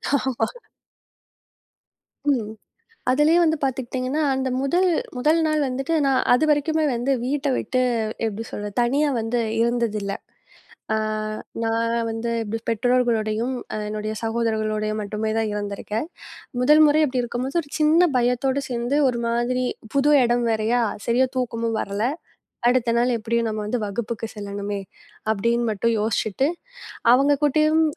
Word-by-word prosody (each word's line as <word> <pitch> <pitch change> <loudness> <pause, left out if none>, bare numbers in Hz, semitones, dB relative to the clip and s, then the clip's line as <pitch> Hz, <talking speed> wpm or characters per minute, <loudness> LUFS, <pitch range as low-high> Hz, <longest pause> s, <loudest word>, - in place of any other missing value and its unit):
ஆமா. 255 -4 0 1.8
ம். 220 -5 -1 0.6
அதுலயும் 310 +6 +4
வந்து 315 -1 +2
பாத்துக்கிட்டீங்கன்னா, 260 +2 -1
அந்த 265 0 -1
முதல் 350 +7 +2 0.3
முதல் 310 +6 +3
நாள் 310 -1 +1
வந்துட்டு 270 +5 -2
நான் 270 -1 +3
அதுவரைக்கும் 305 +3 +2 0.2
வந்து 245 +4 0
வீட்ட 285 +2 -1
விட்டு 255 0 0 0.4
எப்படி 220 0 -3
சொல்றது? 205 0 -5
தனியா 285 +5 +2
வந்து 225 +2 -1 0.2
இருந்தது 235 -2 +1
இல்ல. 200 0 -3 0.8
அ - - +2 0.7
நான் 230 +1 0 0.2
வந்து 225 +1 -3
எப் 220 +1 -3
பெற்றோர்களுடையும், 235 0 +1 0.3
என்னுடைய 215 +1 -3
சகோதரர்களுடைய 220 -2 -1
மட்டுமே 210 +1 -3
தான் 220 -1 0
இருந்திருக்கேன். 210 +5 -3 0.6
முதல் 300 +4 +6
முறை 305 +1 +4
அப்படி 255 -2 -1
இருக்கும்போது 250 +6 -2
ஒரு 285 - -18
சின்னப் 315 0 +4
பயத்தோடு 255 +3 +1
சேர்ந்து 240 +3 -1
ஒரு 235 -1 -1
மாதிரி 240 +2 0 0.3
புது 280 +2 +4
இடம் 240 0 +1
வேறயா? 225 +2 +1 0.2
சரியா 250 +2 +3
தூக்கமும் 230 -2 -1
வரல. 200 +2 -3 0.7
அடுத்த 245 -2 +2
நாள் 245 +1 +2
எப்படியும் 230 +1 0
நம்ம 215 0 -3
வந்து 245 +4 -1
வகுப்புக்கு 225 +2 -4
செல்லணுமே, 200 0 -4 0.5
அப்படின்னு 235 +3 +1
மட்டும் 230 +3 0
யோசிச்சுட்டு 220 +3 0 0.7
அவங்க 275 +3 +5
கூட்டயும் 310 +2 +3
240 Hz, 125 wpm, -23 LUFS, 220-270 Hz, 1.8 s, முதல்